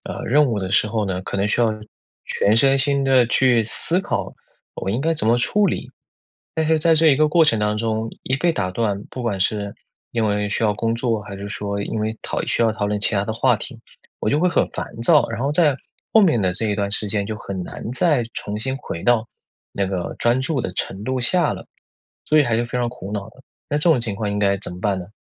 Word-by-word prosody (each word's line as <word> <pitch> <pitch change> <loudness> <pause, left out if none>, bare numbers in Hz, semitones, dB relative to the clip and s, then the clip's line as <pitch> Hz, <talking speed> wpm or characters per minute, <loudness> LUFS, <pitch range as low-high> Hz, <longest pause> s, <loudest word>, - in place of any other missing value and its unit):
呃， - - -6
任 145 +5 +4
务 110 -5 -1
的 95 - -4
时 95 - +3
候 110 0 -1
呢， 95 -2 -2
可 100 - -4
能 100 +2 +1
需 120 - +1
要 115 -2 +3 0.5
全 105 +2 +2
身 135 +3 +4
心 140 0 +1
地 130 -3 +4
去 120 -1 +3
思 165 - +1
考 - - -3 0.4
我 - - -5
应 110 +6 0
该 165 +3 +1
怎 150 - -2
么 115 +2 +4
处 205 +11 +2
理。 - - -3 0.6
但 160 -1 0
是 160 0 +3
在 165 +1 +3
这 160 +1 +4
一 140 - +6
个 155 +1 +3
过 165 +1 +4
程 115 -7 +3
当 105 0 0
中 110 0 -2
一 130 - -1
被 170 +4 +1
打 95 - -1
断， 100 0 -2
不 125 - -6
管 100 -5 -1
是 100 +1 -1 0.4
因 115 -2 0
为 105 0 -1
需 110 - 0
要 105 - +3
工 115 +1 -1
作， 115 -3 -1
还 100 -2 -8
是 100 +1 -7
说 100 -1 -3
因 110 +2 -3
为 110 +1 -2
讨 - - -3
需 - - 0
要 115 -1 +3
讨 105 -1 -2
论 105 0 -1
其 110 - +2
他 100 - 0
的 110 - -2
话 120 +1 +3
题， 115 +2 -8 0.4
我 105 - 0
就 145 - +2
会 180 - +3
很 - - +1
烦 115 - -7
躁。 115 - +4
然 115 - -4
后 140 - 0
在 150 -4 +3 0.4
后 220 - +7
面 160 - +3
的 90 -1 +1
这 110 +4 +1
一 105 - 0
段 100 -1 -2
时 105 0 0
间 100 0 -1
就 110 +1 -4
很 95 -3 -5
难 110 - -7
再 140 -2 +2
重 105 +1 -4
新 130 +3 -2
回 85 -9 -6
到 115 -2 +2 0.4
那 100 -1 -1
个 90 -2 -3
专 120 +2 +2
注 135 -2 0
的 - - -3
程 95 +2 -3
度 130 +2 -1
下 155 +7 +2
了， - - -9 0.6
所 155 - +2
以 150 - +6
还 120 -3 0
是 120 +1 0
非 125 - -3
常 120 -1 0
苦 105 -5 -8
恼 105 +1 -5
的。 130 - -19 0.3
那 145 - 0
这 170 - +3
种 145 -7 +4
情 110 -4 -3
况 105 -1 -2
应 105 - -2
该 100 -1 +2
怎 100 - -2
么 90 - -9
办 100 -2 0
呢？ 90 - -8
115 Hz, 280 characters per minute, -21 LUFS, 105-135 Hz, 0.6 s, 后